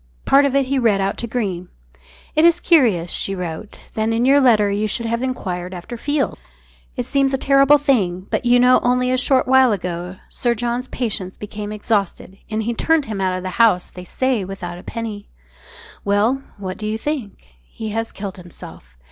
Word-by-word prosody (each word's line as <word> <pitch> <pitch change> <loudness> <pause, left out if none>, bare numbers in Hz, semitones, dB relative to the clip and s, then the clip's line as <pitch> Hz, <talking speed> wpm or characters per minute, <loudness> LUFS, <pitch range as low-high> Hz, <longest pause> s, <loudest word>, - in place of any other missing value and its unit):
Part 280 +1 +5
of 275 -1 0
it 275 -1 +3
he 270 +1 0
read 220 -5 +2
out 195 0 0
to 235 - -4
Greene 195 -7 -3 0.7
"It 310 - +4
is 340 0 +5
curious," 225 - +3
she 195 - -2
wrote, 180 +3 -6 0.2
"that 220 0 -1
in 230 +2 +1
your 275 +2 +5
letter 215 -6 +4
you 210 +2 0
should 230 +3 -2
have 230 +1 -1
enquired 185 -8 -4
after 180 +7 -7
Field. 285 +4 -1 0.6
It 245 - -3
seems 275 0 +1
a - - -1
terrible 275 +2 +5
thing, 215 - +1
but - - 0
you 245 0 +4
know 250 +1 +5
only 250 +1 +1
a 255 - +2
short 260 0 +2
while 260 -1 +5
ago 180 -2 -4
Sir 240 -1 -1
John's 240 +2 -2
patience 205 -8 -3
became 210 0 -6
exhausted, 205 -2 -2
and 220 0 -2
he 235 +2 -1
turned 320 +5 +1
him 210 -3 -4
out 185 -1 0
of 185 - -6
the 185 +4 -1
house, 195 -6 +3
they 180 - -10
say 250 +3 -1
without 180 -2 -7
a - - -13
penny. 220 -3 -6 0.7
Well, 210 +7 +1 0.2
what 185 -2 -6
do 215 - -4
you 215 +1 -1
think? 225 - -5
He 215 - -8
has 225 +2 -3
killed 195 -2 -7
himself. 110 - -12
220 Hz, 200 wpm, -20 LUFS, 195-255 Hz, 0.7 s, Part